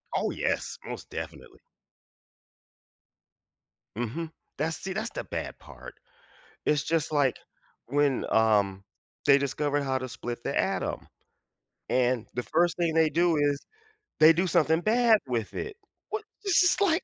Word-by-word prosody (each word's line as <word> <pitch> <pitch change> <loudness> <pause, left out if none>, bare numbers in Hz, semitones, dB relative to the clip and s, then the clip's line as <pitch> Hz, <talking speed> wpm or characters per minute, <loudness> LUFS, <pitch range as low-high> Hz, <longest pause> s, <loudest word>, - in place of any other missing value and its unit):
Oh - - 0
yes, - - -2
most - - -7
definitely. - - -8 2.4
Mhm, 150 +8 -3 0.3
that's 160 +1 -1
see, 190 -1 -5
that's 220 +3 -2
the - - -5
bad - - -5
part. - - -12 0.7
It's 150 -1 +2
just 160 0 -1
like 140 -4 +2 0.5
when 140 +1 +1
um, 100 -3 +2 0.4
they 140 -1 +7
discovered 145 +1 0
how 130 -1 0
to 130 - -5
split 120 -1 -6
the - - -3
atom - - -1 0.8
and 125 -2 +1
the 125 0 -2
first 175 +2 +1
thing 170 -2 +1
they 160 -1 +4
do 170 +2 +2
is 145 -1 +1 0.5
they 155 +1 +9
do 180 +3 +1
something 165 -1 +3
bad 225 +1 +4
with 115 -3 -2
it. 430 0 -5 0.3
What 430 0 -3 0.2
this 375 -2 +4
is 360 - +3
like 350 -4 +3
150 Hz, 140 wpm, -28 LUFS, 130-175 Hz, 2.4 s, they